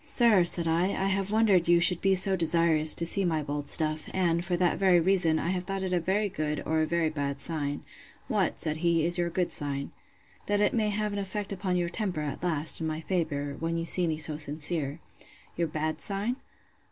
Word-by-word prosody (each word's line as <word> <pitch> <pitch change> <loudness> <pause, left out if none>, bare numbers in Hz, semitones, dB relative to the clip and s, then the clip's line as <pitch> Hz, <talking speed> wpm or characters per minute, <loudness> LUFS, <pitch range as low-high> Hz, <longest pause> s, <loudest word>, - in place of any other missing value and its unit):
—Sir, 235 -10 +3
said 170 -1 +3
I, 165 +2 +1
I 195 +1 -1
have 195 +1 -1
wondered 210 -6 +2
you 170 0 +4
should 170 0 +5
be 195 0 +2
so 190 +1 +2
desirous 165 -2 +4
to 170 - +1
see 195 +4 +3
my 160 -4 -1
bold 145 0 -3
stuff; 155 -1 +2
and, 170 -2 0
for 175 -1 -2
that 175 -1 0
very 185 -3 +3
reason, 170 -2 +2
I 165 - -3
have 180 -1 -3
thought 195 0 -4
it 185 -1 -3
a 180 - +1
very 195 +5 -1
good, 155 -5 -4
or 160 0 0
a 155 - -1
very 165 -1 -1
bad 140 -2 -4
sign. 145 -2 -4 0.4
What, - - -1
said 155 0 +3
he, 165 -1 0
is 175 +1 +2
your 175 0 -1
good 175 +1 -2
sign?—That 145 +7 -5
it 205 - +1
may 215 -3 0
have 210 0 -3
an 205 - -3
effect 200 +1 -5
upon 185 -2 -3
your 175 -1 -1
temper, 180 -3 -3
at 150 -2 -6
last, 165 -2 -1
in 160 - -2
my 155 0 -4
favour, 155 -6 -3
when 165 +1 -3
you 165 - -4
see 175 +1 +6
me 155 -1 -2
so 155 -1 +3
sincere. 150 -1 -2 0.6
Your 170 -1 -1
bad 155 0 -4
sign? 205 +5 -1
170 Hz, 220 wpm, -27 LUFS, 155-190 Hz, 0.6 s, see